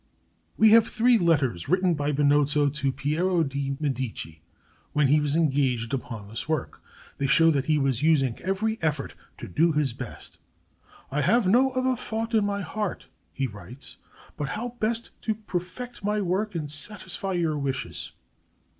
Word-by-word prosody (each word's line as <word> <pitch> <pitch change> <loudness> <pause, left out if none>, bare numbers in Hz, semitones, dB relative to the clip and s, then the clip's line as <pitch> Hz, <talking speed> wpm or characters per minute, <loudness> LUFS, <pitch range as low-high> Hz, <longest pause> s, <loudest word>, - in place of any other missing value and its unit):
We 220 - +6
have 225 +1 +6
three 240 0 +3
letters 140 - +1
written 185 0 +3
by 145 -1 -1
Benozzo 145 0 +3
to 140 -1 -1
Piero 165 +6 0
de' 140 -1 -3
Medici 130 - -4 0.5
when 150 -3 +3
he 150 +2 +5
was 150 0 0
engaged 135 -7 +1
upon 115 -6 -5
this 115 +8 -6
work. 155 -4 -2 0.4
They 140 - +1
show 165 +4 +5
that 140 -3 0
he 155 -1 +2
was 135 -3 0
using 145 -6 +2
every 215 +4 -1
effort 150 -3 -1 0.2
to - - -8
do 165 - +2
his 150 -5 +1
best. 125 -2 -8 0.7
"I 145 +2 0
have 220 - +3
no 250 +7 +5
other 255 0 +1
thought 225 0 -3
in 220 -2 +4
my 200 0 -2
heart," 210 +1 -4 0.2
he 135 - -2
writes, 120 +4 -10 0.4
"but 145 -2 -3
how 235 +8 -3
best 225 +2 -1
to 220 - -1
perfect 210 +4 -6
my 210 +1 0
work 195 +2 -1
and 150 -3 -3
satisfy 190 +3 -2
your 165 -3 0
wishes." 135 -2 -3
155 Hz, 165 wpm, -26 LUFS, 140-200 Hz, 0.7 s, We